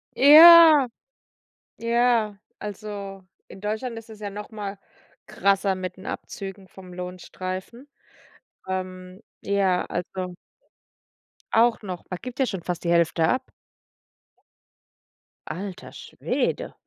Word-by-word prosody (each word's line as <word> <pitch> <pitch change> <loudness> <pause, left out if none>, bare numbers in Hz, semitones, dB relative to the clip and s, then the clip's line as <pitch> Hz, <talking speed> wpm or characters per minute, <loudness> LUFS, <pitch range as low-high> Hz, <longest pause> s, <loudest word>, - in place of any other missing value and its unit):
Ja, 310 -1 +9 0.9
ja. 230 -3 +1 0.2
Also, 200 -2 -7 0.2
in 190 - -12
Deutschland 220 +3 -4
ist 225 - -13
es 215 -1 -12
ja 205 - -5
noch 205 +3 -8
mal 205 -2 -6 0.5
krasser 195 0 +1
mit 185 0 -6
den 190 - -12
Abzügen 195 -1 -7
vom 185 -2 -13
Lohnstreifen. 185 +7 -7 0.8
Ähm, 185 +1 -6 0.2
ja, 195 -2 +1
also 180 +1 -5 1.2
Auch 230 +1 +3
noch? 185 -4 -7
Man 180 - -5
gibt 250 +1 -8
ja 265 - +3
schon 190 -6 -4
fast 180 -2 -4
die 170 - 0
Hälfte 165 -1 +2
ab. 255 - +1 2.1
Alter 190 0 -7
Schwede. - - -3
200 Hz, 110 wpm, -24 LUFS, 185-230 Hz, 2.1 s, Ja